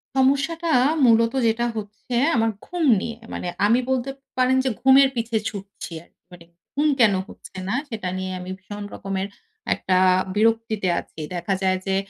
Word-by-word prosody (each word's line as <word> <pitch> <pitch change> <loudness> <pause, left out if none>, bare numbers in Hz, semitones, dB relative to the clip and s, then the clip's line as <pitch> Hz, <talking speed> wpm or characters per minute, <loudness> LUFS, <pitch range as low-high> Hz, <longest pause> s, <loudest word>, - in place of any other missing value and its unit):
সমস্যাটা 280 +5 +2 0.3
মূলত 230 +1 +4
যেটা 230 +2 +1
হচ্ছে 215 +3 -6 0.2
আমার 225 -1 +2 0.2
ঘুম 355 -2 -3 0.2
নিয়ে। 230 -1 -5 0.2
মানে 180 - -4 0.2
আমি 235 +4 +4
বলতে 260 0 0 0.3
পারেন 255 +1 +3
যে - - +3
ঘুমের 265 +1 +6
পিছে 230 -1 -2
ছুটছি 200 -3 -9
আরকি। - - -31
মানে 175 -1 -13 0.3
ঘুম 295 +2 +2
কেন 215 -4 +6
হচ্ছে - - -14
না? 235 - 0
সেটা 210 -6 -4
নিয়ে 185 0 -3
আমি 180 +1 -7
ভীষণ 205 +2 -8
রকমের 195 0 -3 0.5
একটা 185 0 0 0.4
বিরক্তিতে 225 -2 +1
আছি। - - -12 0.2
দেখা 195 +3 -1
যায় 185 -1 +2
যে 190 - +1
225 Hz, 160 wpm, -23 LUFS, 195-255 Hz, 0.5 s, ঘুমের